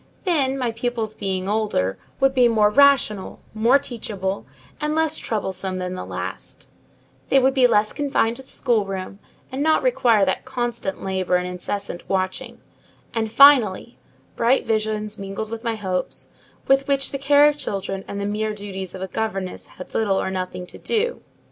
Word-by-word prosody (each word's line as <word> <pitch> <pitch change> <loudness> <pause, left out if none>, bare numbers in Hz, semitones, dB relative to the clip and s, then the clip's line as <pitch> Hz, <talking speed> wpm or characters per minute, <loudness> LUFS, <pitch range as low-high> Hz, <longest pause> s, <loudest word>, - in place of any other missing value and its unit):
Then, 280 -8 +1
my 245 -3 -1
pupils 230 -1 -2
being 190 -3 -3
older, 205 - 0 0.2
would 270 0 +3
be 250 -2 +5
more 215 -3 +3
rational, 270 -7 +3
more 230 +5 +4
teachable, 205 -7 -4 0.3
and 300 0 -1
less 320 -1 +1
troublesome 190 -3 -2
than 180 0 -3
the 185 - -6
last; - - -6 0.6
they 275 - +5
would 265 0 +4
be 260 -2 +5
less 215 -2 +2
confined 270 -5 0
to - - -9
the 265 - -18
schoolroom, 195 -5 -1 0.3
and 265 +2 -3
not 315 +1 +3
require 240 - +3
that 190 - -1
constant 240 -6 -3
labour 190 -1 0
and 180 0 0
incessant 180 +1 -5
watching; 185 -1 -2 0.5
and, 220 -2 -1
finally, 240 -5 +5 0.4
bright 240 +3 +2
visions 215 -1 -1
mingled 200 +2 -5
with 230 0 -5
my 230 -2 -1
hopes, 185 -4 -3 0.4
with 270 0 +3
which 275 -1 +1
the 275 - -3
care 285 +1 +6
of 295 - +2
children 195 -7 -3
and 200 - -5
the 200 - -2
mere 210 +1 -2
duties 190 -3 -6
of 190 - -6
a - - -3
governess 195 -3 -4
had 185 - -12
little 200 -3 +1
or 190 - -2
nothing 185 -1 -4
to - - -13
do. 470 +2 -1
220 Hz, 170 wpm, -22 LUFS, 195-265 Hz, 0.6 s, care